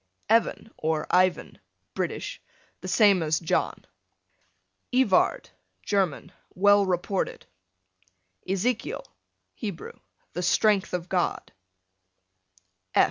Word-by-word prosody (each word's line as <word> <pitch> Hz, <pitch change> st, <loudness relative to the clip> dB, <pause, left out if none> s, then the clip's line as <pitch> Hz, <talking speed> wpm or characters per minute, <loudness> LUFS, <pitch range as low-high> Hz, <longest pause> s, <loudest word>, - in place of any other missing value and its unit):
Evan, 225 Hz, 0 st, +2 dB
or 155 Hz, -1 st, 0 dB
Ivan, 185 Hz, 0 st, +2 dB, 0.3 s
British, -, -, -4 dB, 0.4 s
the -, -, -8 dB
same 200 Hz, -5 st, +4 dB
as 160 Hz, 0 st, +1 dB
John. 165 Hz, -, -1 dB, 1.1 s
Evard, 215 Hz, -, +2 dB, 0.3 s
German, 190 Hz, -4 st, -1 dB, 0.2 s
well 205 Hz, +1 st, +5 dB
reported. 185 Hz, +1 st, -2 dB, 1.0 s
Ezekiel, 225 Hz, -, -1 dB, 0.5 s
Hebrew, 200 Hz, -7 st, -7 dB, 0.3 s
the 180 Hz, -, -3 dB
strength 195 Hz, +1 st, +2 dB
of 175 Hz, -1 st, -4 dB
God. 180 Hz, -2 st, -1 dB
190 Hz, 80 wpm, -26 LUFS, 175-205 Hz, 1.1 s, well